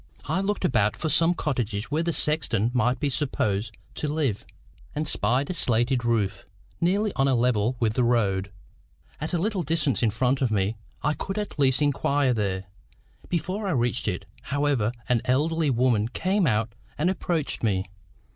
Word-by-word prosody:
I 190 - 0
looked 200 -1 -1
about 110 - +2
for 160 - -2
some 165 +3 +4
cottage 120 -7 -2
where 155 +2 +1
the 170 0 0
sexton 125 -9 +1
might 125 0 +2
be 145 - 0
supposed 110 -6 -1 0.2
to 150 - -2
live, 140 -9 -1 0.5
and 150 +1 -1
spied 125 - +1
a - - -1
slated 120 -4 +1
roof, 105 -5 0 0.4
nearly 200 +4 +2
on 135 - +2
a 135 - +3
level 120 -1 +2
with 110 -2 +1
the 125 - +1
road, 100 -5 +1 0.7
at 150 - -4
a 175 - +1
little 195 +2 0
distance 155 -4 0
in 115 - +3
front 125 +5 0
of 130 - +2
me. 105 0 0 0.3
I 150 - +2
could 195 +6 -5
at 210 -7 -4
least 135 +1 +3
inquire 140 -2 +2
there. 100 -4 -1 0.7
Before 185 +4 -2
I - - 0
reached 120 -2 0
it, - - -2 0.2
however, 140 -6 0 0.2
an 120 -2 +2
elderly 155 +4 +1
woman 120 -4 +2
came 185 - +1
out 110 -1 0 0.2
and 150 +5 +1
approached 175 -4 -1
me. 95 -4 +1
130 Hz, 175 wpm, -26 LUFS, 115-155 Hz, 0.7 s, some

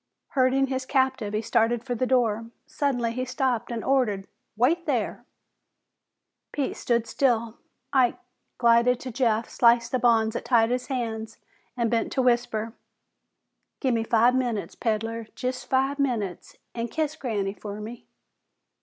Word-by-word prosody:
Herding 265 0 +3
his 260 -1 -3
captive, 260 -6 +1
he 215 - -1
started 230 +1 +1
for 250 -1 -3
the 250 +2 -1
door. 230 -3 +1 0.2
Suddenly 275 -6 -1
he 255 +2 -3
stopped 255 -2 -1
and 230 -2 -3
ordered, 235 -8 +1 0.3
"Wait 325 +9 +2
thar!" 250 -7 -1 1.3
Pete 280 -3 -2
stood 235 -1 0
still. 235 -3 0 0.3
Ike 255 -3 +3 0.4
glided 235 +1 +4
to 255 - -5
Jeff, 230 -2 +1
sliced 235 -1 +3
the 255 - +1
bonds 225 -2 +3
that - - -3
tied 235 -1 +3
his 250 0 -1
hands, 225 -4 -4 0.4
and 235 -1 0
bent 230 -1 0
to 265 - +1
whisper, 235 -2 +1 1.1
"Gimme 235 -5 +1
five 230 +2 +4
minutes, 245 -5 -1
peddler 225 0 -2
jest 255 0 -4
five 270 +2 +1
minutes 225 -10 -2 0.2
an' 230 0 -3
kiss 310 +5 -2
Granny 210 -9 -2
fer 205 0 -7
me." 225 +3 -9
240 Hz, 145 wpm, -26 LUFS, 225-260 Hz, 1.3 s, glided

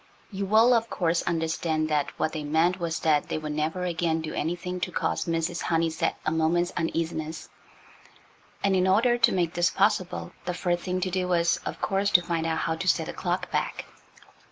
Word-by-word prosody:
You 195 0 -3
will, 225 +4 +5
of 230 -1 +1
course, 170 -2 0
understand 160 -1 0
that 150 -2 +1
what 155 - 0
they 155 -2 -4
meant 165 +5 +2
was 165 -2 -2
that 150 -2 +2
they - - -1
would 155 -1 -4
never 155 +4 -2
again 170 -2 0
do 160 -1 -5
anything 175 +3 -3
to 180 - -2
cause - - -1
Mrs. 165 +1 -1
Honeysett 165 -1 0
a 155 - +1
moment's 165 +2 +1
uneasiness, 165 -1 -3 1.1
and 195 -1 +3
in 185 0 +2
order 235 +6 +3
to - - +5
make 175 -3 0
this 175 0 +2
possible 195 -2 0
the 180 - -2
first 175 -1 -1
thing 185 0 -1
to 185 0 -1
do 185 0 -1
was, 170 -1 +2
of - - -5
course, 200 0 +1
to 175 - -5
find 165 -1 -1
out 160 0 0
how 160 - 0
to 185 - -4
set - - +3
the - - -6
clock - - -2
back. - - -2
170 Hz, 200 wpm, -26 LUFS, 160-185 Hz, 1.1 s, will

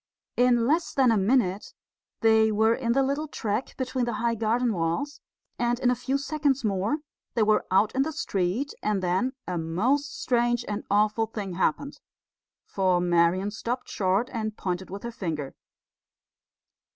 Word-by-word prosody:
In 245 -1 +3
less 320 +4 +1
than 260 -4 +4
a - - +3
minute 200 -2 +1 0.5
they 220 -1 +4
were 220 +2 +3
in 235 -1 0
the 270 +2 +3
little 280 +3 -1
track 225 -3 -3
between 255 -1 -1
the 240 - -2
high 235 +1 0
garden 230 +2 +1
walls; 170 - -2 0.4
and 240 0 +1
in 250 -1 +3
a - - +1
few 265 +3 -1
seconds 280 -2 0
more 205 +9 0 0.3
they 230 - +3
were 215 0 +2
out 200 +3 +3
in 265 - +1
the 310 +4 0
street, 205 - -1
and 210 -3 0
then 185 +9 0
a 180 -2 -2
most 240 - 0
strange 240 -1 +1
and 210 0 -3
awful 210 +2 +2
thing 205 -4 -5
happened. 190 - -1 0.7
For 185 -2 +1
Marian 175 +3 +2
stopped 240 +4 -4
short 200 +3 0
and 215 -2 -3
pointed 185 0 -3
with 200 +1 -7
her 235 - -4
finger. 160 - -4
225 Hz, 165 wpm, -26 LUFS, 195-250 Hz, 0.7 s, than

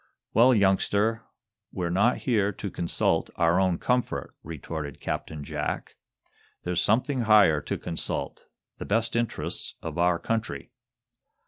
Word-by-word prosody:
"Well, 120 +3 +6
youngster, 105 +2 +2 0.5
we're 85 -2 -2
not 100 +7 +3
here 105 -5 +2
to 100 -2 -6
consult 85 - 0
our 85 +2 +3
own 95 -2 +2
comfort," 125 +5 -1
retorted 75 -2 -6
Captain 75 -2 -4
Jack. - - -4 0.7
"There's 90 -1 0
something 130 +5 +1
higher 105 -9 +5
to 75 - -3
consult 85 - -4 0.3
the - - -5
best 115 +3 0
interests 115 -1 -2
of 80 0 -5
our 90 0 +3
country." 115 +5 -3
100 Hz, 125 wpm, -27 LUFS, 85-115 Hz, 0.7 s, Well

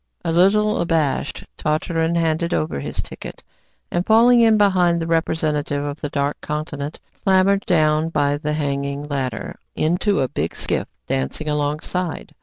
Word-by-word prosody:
A 165 - +1
little 210 +5 +3
abashed, 160 -5 0
Tartarin 160 +2 0
handed 165 0 +1
over 75 -3 -1
his - - -4
ticket, - - -9 0.5
and 175 - 0
falling 235 +4 +5
in 225 -1 +5
behind 185 -4 +3
the 165 - -2
representative 155 -3 0
of 145 +1 -5
the 145 - -3
Dark 140 0 -2
Continent, 150 -1 -4 0.2
clambered 195 +1 +3
down 155 -2 +3
by 145 -2 +1
the 150 0 -2
hanging 140 -1 -2
ladder 135 -5 -4 0.2
into 175 +5 +1
a 130 - +1
big - - -3
skiff - - -2 0.2
dancing 65 - -2
alongside. 150 +4 -2
155 Hz, 145 wpm, -21 LUFS, 145-175 Hz, 0.5 s, falling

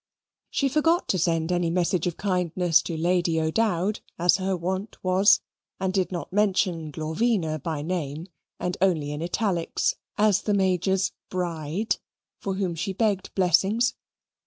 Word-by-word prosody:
She 275 - +1
forgot 325 +5 +2
to 185 - +2
send 165 -1 +1
any 175 -1 +1
message 175 0 +1
of 175 - -3
kindness 180 -3 +2
to 165 - -4
Lady 170 0 +1
O'Dowd, 185 +4 0 0.2
as 175 +1 +4
her 190 -1 -1
wont 190 +4 -3
was 185 +3 +5 0.4
and 190 -1 -1
did 190 -1 0
not 175 0 -5
mention 185 -5 +1
Glorvina 160 - -1
by 155 -2 -3
name, 160 -2 -3 0.3
and 180 0 -2
only 160 -7 +2
in 150 +1 -4
italics, 175 0 0 0.2
as 210 -2 +3
the 210 - 0
Major's 190 0 +1 0.2
BRIDE, 175 +2 -2 0.4
for 195 -1 -3
whom 190 -3 -1
she 170 +4 -3
begged 200 -2 -1
blessings. 195 +6 +3
180 Hz, 145 wpm, -25 LUFS, 165-195 Hz, 0.4 s, was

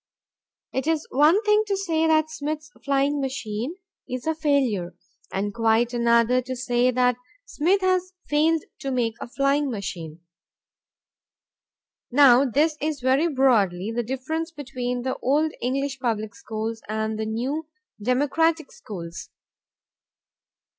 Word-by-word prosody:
It 265 +3 -2
is 320 -1 +1
one 310 - +4
thing 425 0 +4
to 395 -1 0
say 325 -4 +1
that 315 -1 +3
Smith's 305 0 -4
flying 280 +1 +1
machine 260 +1 -3 0.3
is 255 -1 -4
a 320 - +1
failure, 275 - 0 0.4
and 200 +1 -2
quite 230 +2 +2
another 235 +1 +3
to 255 +1 -5
say 245 0 +1
that 250 -1 +2 0.3
Smith 375 +1 +1
has 370 0 +1
failed 310 +2 +2 0.2
to 275 - -4
make 245 -4 0
a - - -5
flying 275 +3 +1
machine. 175 -7 -6 1.9
Now 265 0 +6
this 300 +5 +2
is 305 -1 -1
very 265 +6 +3
broadly 225 - +2
the 240 +1 -1
difference 265 +7 -3
between 250 -5 -4
the 260 0 -2
old 300 +4 +1
English 265 +2 -1
public 220 -4 -2
schools 220 +2 -5
and 220 0 -2
the 220 - -2
new 265 +8 -2 0.3
democratic 290 +7 +1
schools. 170 -5 -8
260 Hz, 130 wpm, -24 LUFS, 235-305 Hz, 1.9 s, Now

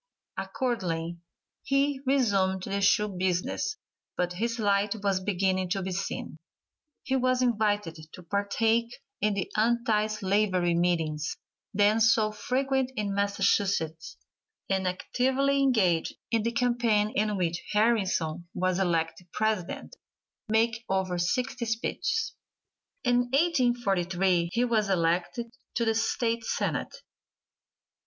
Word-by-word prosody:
Accordingly 175 -10 -2 0.4
he 275 0 +1
resumed 195 -8 +2
the 200 +1 -2
shoe 200 +2 +4
business, 185 - -1 0.4
but 180 0 0
his 230 +5 -2
light 205 -1 +1
was 195 -2 +2
beginning 185 -1 0
to 195 +1 -1
be 190 - -3
seen. 190 +2 -4 0.7
He 265 -1 -1
was 255 0 +2
invited 210 -8 0
to 180 - -11
partake 225 +5 0 0.3
in 210 0 +2
the 195 - -3
anti 220 -1 +2
slavery 195 -4 +1
meetings, 165 -3 0 0.3
then 210 +1 +3
so 220 -1 +4
frequent 265 +4 -1
in 205 -3 -2
Massachusetts, 200 -5 0 0.5
and 190 -1 0
actively 265 +9 +1
engaged 195 -11 +2 0.2
in 230 -1 +2
the 230 +2 -1
campaign 235 -3 +1
in 210 -1 0
which 170 -2 -1
Harrison 190 -7 +1
was 185 0 0
elected 170 -1 -1
President, 215 - -2 0.5
making 225 +1 +2
over 190 -2 0
sixty 240 +7 -1
speeches. 230 - -1 0.7
In 245 -1 +2
1843 195 - +2
he 240 +4 +1
was 220 -4 +1
elected 180 +6 0 0.2
to 235 - +1
the 225 - +2
State 230 +1 0
Senate. - - -2
210 Hz, 115 wpm, -28 LUFS, 185-235 Hz, 0.7 s, shoe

